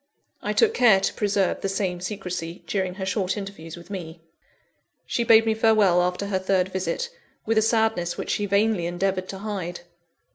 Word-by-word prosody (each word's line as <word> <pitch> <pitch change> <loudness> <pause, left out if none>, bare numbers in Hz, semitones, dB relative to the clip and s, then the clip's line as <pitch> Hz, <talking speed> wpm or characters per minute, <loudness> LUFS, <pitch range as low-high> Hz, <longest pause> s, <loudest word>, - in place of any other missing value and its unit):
I - - -2
took 450 -1 +3
care 220 - +5
to - - -1
preserve 200 -2 0
the 195 - -1
same 190 -2 -2
secrecy, 180 -3 -5
during 185 -2 -2
her 190 -1 -4
short 190 +1 -1
interviews 195 -5 -7
with 170 +3 -13
me. 170 -4 -6 0.9
She 235 - -1
bade 225 -1 +6
me 220 - +2
farewell 215 -5 +4
after 180 +2 -1
her 195 -2 -1
third 190 -1 +1
visit, 190 - -2 0.4
with 225 0 +3
a - - +2
sadness 220 -6 +1
which - - -3
she 205 - -1
vainly 200 -3 +2
endeavoured 185 +1 -1
to 195 - -5
hide. 190 -4 -5
195 Hz, 180 wpm, -24 LUFS, 180-210 Hz, 0.9 s, bade